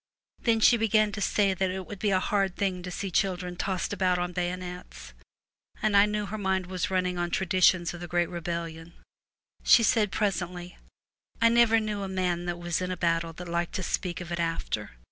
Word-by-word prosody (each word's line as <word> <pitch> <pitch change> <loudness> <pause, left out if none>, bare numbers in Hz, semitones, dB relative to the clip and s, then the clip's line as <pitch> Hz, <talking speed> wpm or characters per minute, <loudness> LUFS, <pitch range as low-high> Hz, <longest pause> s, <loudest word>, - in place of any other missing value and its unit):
Then 230 -2 +2
she 235 - +6
began 215 -1 +2
to 210 +1 -5
say 200 0 +2
that 190 0 0
it 185 0 -4
would 205 +1 -9
be 210 - +1
a 190 -1 +3
hard 195 -1 0
thing 190 -3 -1
to 180 - -6
see 190 +2 -4
children 180 -1 0
tossed 185 +1 -2
about 185 -2 +1
on 180 0 -2
bayonets, 180 - -5 0.7
and 215 -1 +1
I 200 +1 +7
knew 210 0 -2
her 215 +2 -5
mind 190 -2 0
was 185 -1 -3
running 180 -1 0
on 175 0 -1
tradi 185 +1 -1
tions 175 -1 +4
of 175 - -9
the 175 - -6
great 175 0 +1
rebellion. 170 -1 -5 0.7
She 235 - +6
said 210 -2 +2
presently, 180 -3 -2 0.3
' - - -39
I 230 - +5
never 230 -1 +5
knew 210 -2 -3
a 195 - -3
man 180 -2 -1
that 175 -1 -3
was 175 0 -2
in 185 - -2
a 185 - -3
battle 165 -1 0
that 175 +2 -9
liked 170 0 -2
to 185 - -2
speak 180 -1 -2
of 175 0 -8
it 170 - -2
after. 165 - -2
185 Hz, 215 wpm, -27 LUFS, 175-200 Hz, 0.7 s, I